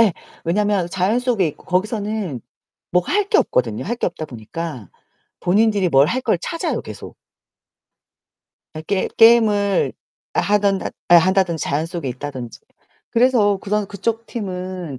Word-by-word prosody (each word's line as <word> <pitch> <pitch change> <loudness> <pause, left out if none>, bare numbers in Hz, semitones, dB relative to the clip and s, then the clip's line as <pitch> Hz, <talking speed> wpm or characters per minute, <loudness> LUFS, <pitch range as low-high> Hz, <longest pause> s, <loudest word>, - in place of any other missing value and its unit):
예. 220 -6 +5 0.3
왜냐면 195 +1 +1
자연 190 +6 +1
속에 240 -8 +1
있고 150 - -12
거기서는 205 - -2 0.5
뭐 180 - +4
할 410 +1 +1
게 430 - +4
없거든요. 115 0 0
할 235 +4 -2
게 - - -1
없다 160 -2 -4
보니까 120 - -7 0.5
본인들이 200 +1 +2
뭘 140 -2 +5
할 255 +8 -1
걸 220 -7 +1
찾아요 335 - -2
계속. - - -10 1.6
예 155 - -5
게 190 +3 -1
게임을 215 -4 +4 0.4
하든 200 -1 +2 0.3
한다든지 175 -1 +4
자연 150 +3 -1
속에 170 -4 -5
있다든지. 130 -2 -6 0.5
그래서 230 -4 +3
그런 205 +1 -1
그쪽 225 +4 -3
팀은 185 - -5
190 Hz, 270 characters per minute, -20 LUFS, 165-215 Hz, 1.6 s, 예